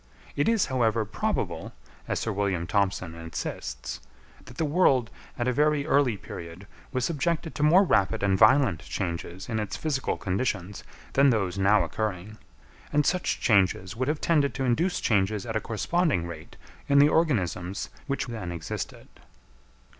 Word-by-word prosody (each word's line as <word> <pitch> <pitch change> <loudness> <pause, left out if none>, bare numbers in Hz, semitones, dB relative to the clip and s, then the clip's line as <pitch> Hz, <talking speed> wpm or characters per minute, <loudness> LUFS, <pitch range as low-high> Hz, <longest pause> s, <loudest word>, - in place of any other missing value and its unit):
It 145 - +2
is, 225 -3 +3
however, 115 -4 +1
probable, 100 - -3 0.3
as - - -1
Sir 115 - -2
William 95 -4 -1
Thompson 95 -3 0
insists, 80 -6 -5 0.5
that - - -13
the 160 - 0
world 140 -7 +3 0.3
at 120 - -1
a 125 - +2
very 150 +1 +2
early 140 -8 +2
period 85 +1 -9 0.3
was 130 -3 0
subjected 165 +1 -1
to - - -5
more 165 +6 +6
rapid 110 - +1
and 100 -1 +3
violent 110 - +5
changes 85 +1 -5
in 110 -2 -2
its 105 -2 -3
physical 145 -4 -1
conditions 95 -1 -2 0.3
than 140 +1 +5
those 100 -5 0
now 100 +2 +4
occurring; 105 0 -4 0.5
and 150 0 +2
such 185 +4 0
changes 95 -2 +2
would 130 +2 -2
have 150 +1 0
tended 150 -4 +2
to 135 - -1
induce 165 +9 +1
changes 105 0 +1
at 115 -2 -4
a 110 - +1
corresponding 125 - 0
rate 80 -2 -9 0.3
in 140 - +4
the 145 +1 +8
organisms 100 - 0 0.2
which 140 -1 -1
then 110 -8 -5
existed. 85 -2 -6
110 Hz, 155 wpm, -27 LUFS, 95-140 Hz, 0.5 s, the